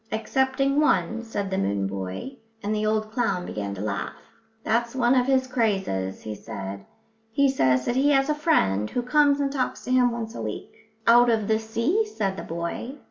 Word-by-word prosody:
"Excepting 265 +5 +1
one," 300 -7 +2
said 205 -4 -4
the 190 - 0
moon 100 0 0
boy, 95 - -5 0.3
and 210 +1 -1
the 215 0 0
old 215 0 0
clown 200 -7 0
began 100 -1 -4
to 95 - -6
laugh. 100 -3 -3 0.5
"That's 235 +2 0
one 245 -1 +3
of 250 -1 +3
his 265 -1 +3
crazes," 195 - -1
he 110 - -5
said. 100 -1 -7 0.4
"He 280 +5 +3
says 130 - +2
that 240 - 0
he 275 +3 +3
has 270 -1 +3
a 305 - +2
friend 105 - +1
who 245 - -2
comes 285 +2 +3
and 280 -1 0
talks 265 -3 -2
to - - -4
him 250 -1 +4
once 230 -1 -5
a - - -6
week." - - -6 0.3
"Out 240 +1 +6
of 220 -3 +1
the 220 0 +2
sea," 230 - 0
said 210 - -2
the - - -6
boy. 170 - -5
225 Hz, 195 wpm, -25 LUFS, 170-265 Hz, 0.5 s, Out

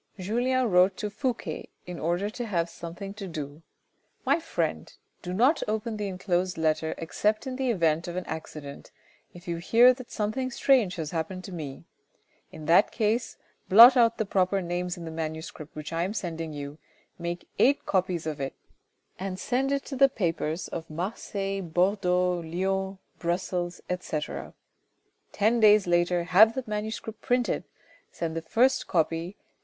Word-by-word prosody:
Julien 245 +6 +1
wrote 180 +1 +4
to 210 -1 -3
Fouque 245 +2 -2 0.4
in 180 -1 -7
order 175 +6 -1
to 240 +1 -5
have 170 -4 -1
something 175 +4 -7
to 200 -2 -7
do. 150 -2 -6 0.3
" - - -42
My - - +3
friend, 330 - -2 0.3
do 180 - -5
not 250 - +3
open 220 +1 -2
the 205 -1 -2
enclosed 185 -1 -1
letter 160 0 0
except 210 - -1
in 260 -1 -4
the 260 -1 -1
event 165 -6 +1
of 175 - -5
an 185 - -3
accident, 150 -3 -7 0.5
if 175 +1 -13
you 170 -1 -2
hear 235 +8 +6
that 255 -1 -11
something 230 +5 -2
strange 245 -6 +3
has 160 -3 -4
happened 175 +3 -3
to 195 - -8
me. 150 -6 -6 0.7
In 155 - -9
that 165 +3 +5
case 225 +1 0 0.3
blot 235 +6 +10
out 230 -2 +4
the 220 - 0
proper 195 0 +1
names 175 0 -3
in 170 - -7
the 160 - -6
manuscript 160 -1 -6
which 150 0 -6
I 165 - 0
am 190 +5 -2
sending 165 -5 -4
you, 145 +1 -7 0.4
make 170 +1 -4
eight 280 +3 +4
copies 185 -3 0
of 155 -2 -4
it, 135 - -3 0.6
and 190 0 -4
send 265 +5 0
it 280 0 -1
to 275 - -5
the 275 +1 +6
papers 165 -6 -2
of 165 -1 -6
Marseilles, 195 +3 -3
Bordeaux, 180 0 +1
Lyons, 190 +3 -2 0.2
Brussels, 175 0 -2
etc. 180 -4 -4 0.8
Ten 220 +3 +2
days 210 -2 +6
later 175 0 +2
have 200 +6 +6
the 260 - -2
manuscript 215 +1 -4
printed, 245 -1 0 0.5
send 165 -1 -4
the 165 - -2
first 245 +10 +2
copy 165 +1 0
to - - -43
M. - - -40
185 Hz, 170 wpm, -27 LUFS, 170-220 Hz, 0.8 s, blot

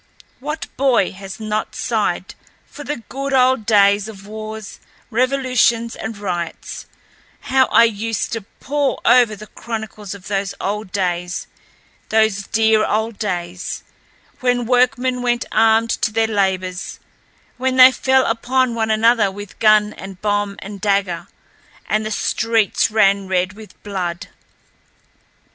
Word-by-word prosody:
What 300 +4 -4
boy 255 -8 +3
has 195 +1 -9
not 215 0 -3
sighed - - -1 0.3
for 290 - -11
the 280 -5 -5
good 275 +1 -4
old 255 -4 +3
days 200 -1 +4
of 195 -3 -11
wars, 215 0 -8 0.3
revolutions, 250 -2 +1
and 220 -1 -6
riots; 175 -4 -5 0.5
how 260 0 +3
I - - +6
used 225 -1 -1
to 225 - -2
pore 280 +7 -2
over 240 -3 +5
the 210 +1 -10
chronicles 215 -3 -7
of 190 -2 -12
those 200 -1 -2
old 205 0 -3
days, 180 -2 -2 0.6
those 220 -3 +2
dear 220 -1 +3
old 220 0 -1
days, 175 -3 -4 0.6
when 245 -1 +1
workmen 250 +1 +2
went 240 0 0
armed 225 0 +3
to 220 - +1
their 225 +1 +2
labors; 190 -3 -1 0.6
when 260 +1 0
they 255 0 +9
fell 265 0 +2
upon 245 +2 +1
one 220 -1 -1
another 220 -1 +3
with 205 +1 -10
gun 215 -1 +4
and 195 -1 -10
bomb 205 -1 -1
and 200 -1 -8
dagger, 195 -4 0 0.6
and 215 +1 +1
the 215 - -3
streets 225 +1 +1
ran 200 -3 +3
red 185 0 0
with 215 0 -13
blood! 180 -4 -4
220 Hz, 135 wpm, -19 LUFS, 200-240 Hz, 0.6 s, they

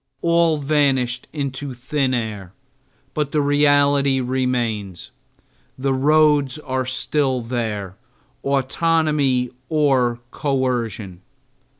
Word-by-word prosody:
All 170 -2 +3
vanished 135 -4 +1
into 140 -2 -4
thin 135 +2 -1
air, 105 -6 -4 0.6
but 150 -2 -2
the 150 - +1
reality 145 -1 +3
remains. 120 -7 -2 0.7
The 135 +1 0
roads 150 0 +3
were 130 0 -1
still 130 0 0
there, 110 -5 -4 0.5
autonomy 140 -2 +1 0.2
or 135 -6 +2
coercion. 120 - -2
130 Hz, 85 wpm, -21 LUFS, 125-145 Hz, 0.7 s, All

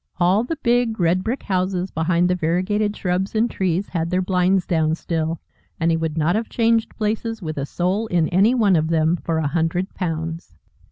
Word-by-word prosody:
All 185 +5 +3
the 290 +7 -3
big 240 -3 +1
red 175 +2 +2
brick 240 +4 -3
houses 185 -1 -1
behind 170 +2 +1
the 180 - +2
variegated 185 +5 0
shrubs 185 +3 -1
and 220 +2 +3
trees 190 -2 -1
had 165 -2 -2
their 180 +1 +1
blinds 185 0 +2
down 160 -2 +1
still, 165 -1 -2 0.4
and 165 0 +2
he 165 - +2
would 160 -1 -3
not 160 +4 +2
have 225 +1 -2
changed 230 -1 +1
places 225 +1 -2
with 155 -5 -5
a 140 - -3
soul 190 +8 -1
in 170 -5 +1
any 200 +8 +3
one 210 -6 +3
of 160 -1 +1
them 160 0 +2
for 165 -1 -2
a 160 - 0
hundred 165 +5 -1
pounds. 165 - -4
180 Hz, 200 wpm, -21 LUFS, 165-205 Hz, 0.4 s, All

